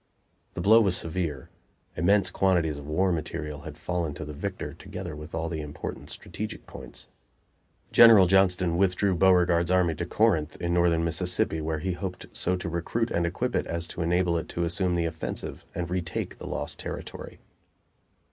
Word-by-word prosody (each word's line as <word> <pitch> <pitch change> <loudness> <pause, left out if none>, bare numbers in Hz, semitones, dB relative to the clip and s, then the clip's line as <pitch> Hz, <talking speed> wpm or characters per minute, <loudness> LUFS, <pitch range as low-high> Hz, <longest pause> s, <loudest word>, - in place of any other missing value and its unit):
The 90 - -3
blow 110 +5 +7
was 95 -4 +2
severe: 80 -5 -3 0.4
immense 95 +3 +3
quantities 85 -7 +1
of 70 - -10
war 90 +5 +2
material 75 -3 -4
had 80 -1 -9
fallen 85 -3 -2
to 80 - -6
the 75 - -7
victor, 95 +6 -5
together 85 -5 -7
with 75 +2 -8
all 80 0 -2
the 80 -2 -3
important 75 -1 -7
strategic 105 +1 -7
points. - - -9 0.8
General 115 -5 +9
Johnston 90 -2 +3
withdrew 95 0 +2
Beauregard's 90 -1 +4
army 90 -2 +3
to 85 +3 -4
Corinth, 85 -8 +1
in 85 0 -1
northern 85 -1 +3
Mississippi, 85 -1 0
where 80 0 -2
he 90 +5 -2
hoped 90 0 -5
so 90 - -1
to 90 -1 -5
recruit 85 +8 -2
and 85 0 +1
equip 85 - -2
it - - 0
as 85 0 -3
to - - -5
enable 85 0 +2
it - - -8
to 85 - -2
assume 90 +1 0
the 85 -1 +1
offensive 80 -1 -4
and 85 0 -2
retake 85 -3 -3
the - - -7
lost 75 - -4
territory. - - -7
85 Hz, 175 wpm, -27 LUFS, 80-95 Hz, 0.8 s, General